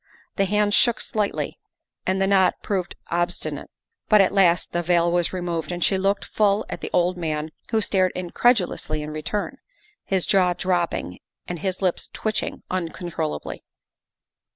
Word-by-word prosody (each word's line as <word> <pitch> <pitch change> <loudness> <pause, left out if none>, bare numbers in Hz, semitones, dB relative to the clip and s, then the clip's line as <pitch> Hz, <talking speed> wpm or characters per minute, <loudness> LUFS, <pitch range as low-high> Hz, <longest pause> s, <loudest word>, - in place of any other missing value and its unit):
The 195 - +2
hands 205 +1 +1
shook 240 +1 +4
slightly 210 -2 -2 0.5
and 190 +1 +1
the 195 - +3
knot 195 -1 +4
proved 190 -4 -2 0.2
obstinate, 175 +1 -2 0.4
but 215 - +7
at 195 - +5
last 180 -3 +3
the 175 - 0
veil 170 0 +2
was 175 -1 +1
removed 175 -2 -3
and 175 0 -2
she 195 - +3
looked 195 +1 0
full 210 -1 +2
at - - -5
the - - -4
old 180 +1 +2
man, 155 -2 -2 0.2
who 220 - +2
stared 185 -3 +2
incredu 185 +4 +3
lously 155 0 -4
in 150 0 -5
return, 155 +7 -3 0.5
his 190 -2 0
jaw 180 -2 +3
dropping 175 - -1 0.3
and 175 -1 -4
his 190 +1 -3
lips 180 -2 +1
twitching 215 -1 -2
uncontrollably. 170 - -3
180 Hz, 155 wpm, -24 LUFS, 175-195 Hz, 0.5 s, but